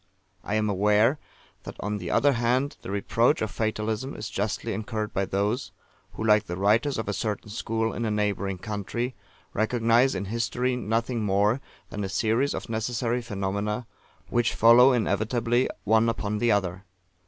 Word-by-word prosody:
I 105 - -2
am 110 0 +1
aware 105 +7 +3 0.4
that, - - -9
on 105 +1 -3
the - - -5
other 145 0 +3
hand, 125 +4 +1
the - - -8
reproach 115 +8 +2
of 110 - -3
Fatalism 110 +4 -2
is 105 -2 -6
justly 105 +3 -2
incurred 110 +1 -4
by 95 - 0
those, 105 +7 -1 0.4
who, - - -5
like 105 -1 +4
the 90 0 -5
writers 110 +8 +2
of 110 - -3
a 105 - -1
certain 105 +1 -3
school 110 +1 -1
in 120 - -3
a 110 - 0
neighbouring 100 -2 -1
country, 105 +6 -3 0.4
recognise 115 +3 +2
in 100 - -3
history 120 +4 -1
nothing 115 0 -1
more 105 +5 +2 0.3
than 105 - -4
a 95 - -3
series 115 +7 +1
of - - -5
necessary 120 +2 -1
phenomena, 105 +1 -3 0.5
which 120 0 +1
follow 120 +3 +7
inevitably 120 +1 +1
one 110 +2 +3
upon 105 -2 -2
the 120 0 +3
other. 95 -2 0
110 Hz, 165 wpm, -26 LUFS, 105-120 Hz, 0.5 s, follow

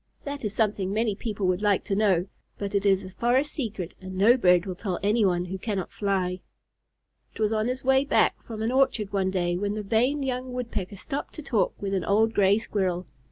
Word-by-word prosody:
That 285 -1 -5
is 210 -1 -2
something 205 -4 0
many 220 +1 +1
people 205 -1 -3
would 185 +1 +1
like 205 -2 +2
to 195 - -2
know, 195 -4 +2 0.3
but 200 0 -4
it 200 0 +1
is 190 -1 +3
a 185 - -9
forest 250 +8 +1
secret, 210 - -4
and 185 0 -7
no 215 +6 +6
bird 180 -7 +4
will 190 - -3
tell 185 0 -3
anyone 200 -4 +2
who 190 +1 -5
cannot 195 -3 -3
fly. 190 -3 -1 1.0
It - - -11
was 215 0 +1
on 215 +1 0
his 255 +1 -3
way 265 +1 +4
back - - +2
from 220 -2 -6
an 225 - 0
orchard 255 -6 +1
one 190 -1 +1
day, 175 -2 0
that 200 +3 -1
the 215 - -3
vain 250 +8 +1
young 255 -1 -3
Woodpecker 225 -6 -4
stopped 275 +8 -5
to 310 - -7
talk 215 -9 0
with 195 -1 -3
an 190 - 0
old 220 +3 +2
Gray 200 -1 +4
Squirrel. 185 -5 -1
205 Hz, 215 wpm, -26 LUFS, 190-235 Hz, 1.0 s, no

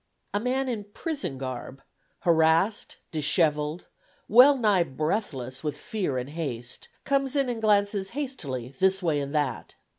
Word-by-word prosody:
A 205 - +1
man 260 +4 0
in 220 -5 -3
prison 205 - -4
garb, 130 0 -6 0.4
harassed, 165 +4 +2
dishevelled, 150 0 +1 0.4
well 260 +6 +7
nigh 210 -6 +3
breathless 140 - -2
with 150 -2 -2
fear 185 -12 -2
and 125 +3 -4
haste, 125 -7 -5
comes 275 0 +1
in 275 -3 +2
and 235 -2 -3
glances 200 -2 +2
hastily 145 - -4
this 190 0 +3
way 155 -4 +1
and 140 +1 -4
that. 145 -5 -2
175 Hz, 140 wpm, -27 LUFS, 145-220 Hz, 0.4 s, well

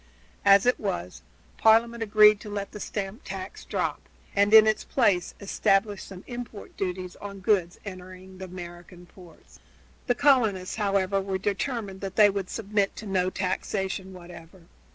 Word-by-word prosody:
As 200 +1 +6
it 250 - +2
was, 90 - -4 0.4
Parliament 230 +1 +4
agreed 210 -1 +6
to 210 - -9
let 200 -1 -4
the 210 - -9
stamp 200 +4 -5
tax - - -7
drop, - - -2 0.3
and 200 +1 +3
in 220 0 +9
its 215 0 +1
place 180 -3 +1
established 200 0 0
some 190 -1 -10
import 240 -4 -8
duties 185 -1 -4
on 200 -1 -8
goods 185 -3 +1
entering 185 -1 -10
the 190 - -6
American 175 0 -10
ports. 175 -2 -17 0.5
The 245 - +2
colonists, 230 -11 +2
however, 195 -2 +1
were 190 0 -2
determined 205 0 -3
that 195 -1 -5
they 210 -2 +6
would 195 -2 -4
submit 205 -2 -1
to 215 - -8
no 185 -2 0
taxation 190 0 -3
whatever. 175 0 -13
195 Hz, 155 wpm, -26 LUFS, 185-210 Hz, 0.5 s, in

